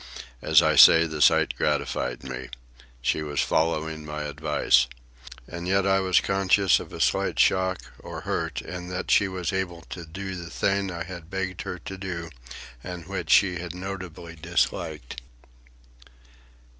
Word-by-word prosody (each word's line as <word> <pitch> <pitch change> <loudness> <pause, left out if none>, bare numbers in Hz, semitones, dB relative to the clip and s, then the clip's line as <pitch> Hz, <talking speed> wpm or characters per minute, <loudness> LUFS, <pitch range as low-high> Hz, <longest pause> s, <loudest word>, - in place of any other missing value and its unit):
As - - +5
I - - +3
say, 80 0 +9
the 80 -2 -5
sight - - +5
gratified 60 -1 -1
me. 65 -2 -6 0.5
She 80 - +1
was 75 -2 -3
following 80 -1 0
my 75 0 -5
advice. 75 -4 +2 0.6
And 85 +1 -6
yet 95 +1 +2
I 95 0 +3
was 95 -1 +3
conscious 95 0 +3
of - - -9
a - - -8
slight - - +1
shock 95 -1 +3 0.2
or - - -8
hurt - - -3
in 90 0 -7
that 90 0 -4
she 100 - +5
was 95 -1 -3
able 90 -3 -3
to 85 - -6
do 95 +4 -6
the 85 -2 -7
thing 100 +2 0
I 85 -2 -4
had 85 -2 -9
begged 95 -1 -3
her 90 - -5
to 95 +3 -8
do 85 -4 -5 0.5
and 90 -2 -7
which 95 -1 -5
she 90 -3 +4
had 85 -1 -6
notably 90 -3 -7
disliked. 80 -5 -2
90 Hz, 155 wpm, -25 LUFS, 80-95 Hz, 0.6 s, say